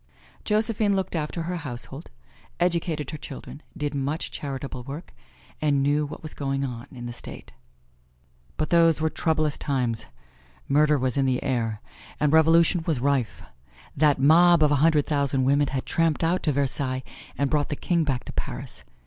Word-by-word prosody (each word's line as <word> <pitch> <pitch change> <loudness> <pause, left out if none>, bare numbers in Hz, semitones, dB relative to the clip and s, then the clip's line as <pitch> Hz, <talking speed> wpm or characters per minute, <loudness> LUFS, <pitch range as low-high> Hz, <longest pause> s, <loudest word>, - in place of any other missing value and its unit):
Josephine 215 -1 +2
looked 190 -2 -2
after 160 +1 -2
her 175 +2 -3
household, 135 0 -7 0.5
educated 170 -4 0
her 155 - -6
children, 140 +2 -9 0.2
did 145 -1 -2
much 140 +3 -2
charitable 135 -2 -5
work, 145 +7 -8 0.5
and 145 -3 +2
knew 145 +1 +1
what 155 - -9
was 155 - -3
going 135 -1 -2
on 120 -3 -6
in 120 -2 -8
the 120 - -5
State. - - -10 1.1
But 155 - -2
those 165 -2 +5
were 160 0 0
troublous 155 -3 0
times. 125 -5 -1 0.6
Murder 150 +1 +4
was 130 0 -1
in 135 -1 +2
the 130 -1 0
air 115 -5 -1 0.4
and 150 0 +2
revolution 165 +2 +5
was 155 -6 +1
rife. 135 -3 0 0.5
That 150 0 +4
mob 165 +4 +6
of 150 - +4
a - - +4
hundred 155 -2 +4
thousand 140 -3 +1
women 140 +2 +3
had 135 -1 -3
tramped 165 -1 +1
out 170 +3 +1
to 155 - +1
Versailles 130 -1 -1 0.3
and 140 -1 0
brought 150 -2 +1
the 145 - -2
king 170 +2 0
back 135 -5 -1
to - - -8
Paris. - - -6
145 Hz, 170 wpm, -25 LUFS, 135-160 Hz, 1.1 s, mob